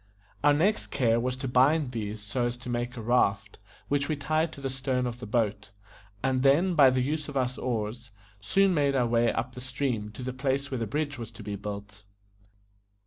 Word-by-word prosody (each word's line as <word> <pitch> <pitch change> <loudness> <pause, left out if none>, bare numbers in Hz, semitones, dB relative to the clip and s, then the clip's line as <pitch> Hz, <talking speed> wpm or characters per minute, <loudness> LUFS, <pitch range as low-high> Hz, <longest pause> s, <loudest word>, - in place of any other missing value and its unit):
Our 145 0 +6
next 185 +9 +1
care 115 -3 +2
was 125 +1 -1
to 130 +1 -5
bind 130 +3 +3
these 110 -2 -4
so 120 +4 -1
as 120 0 -4
to 125 0 -8
make 120 +1 -2
a 115 - -5
raft, 105 -4 +1 0.3
which 140 0 0
we 155 - +1
tied 155 +3 0
to - - -10
the 135 - -3
stern 130 -1 -1
of 120 0 -4
the 125 - -7
boat, 105 -3 0 0.5
and 130 -1 +1
then, 150 +8 +4
by 145 -5 +7
the 130 0 +1
use 150 +2 -2
of 140 - -3
our 130 -2 +2
oars, 120 -1 -3 0.3
soon 195 - +3
made 140 -3 +2
our 125 -2 +3
way 115 0 +3
up 125 +1 -3
the 125 - -8
stream 125 -4 -2
to 125 - -8
the 130 0 -3
place 140 +1 -1
where 130 - -2
the 115 - -2
bridge 145 +3 -2
was 115 -2 -6
to 115 -1 -10
be 100 0 -4
built. 100 0 -7
125 Hz, 215 wpm, -28 LUFS, 115-140 Hz, 0.5 s, by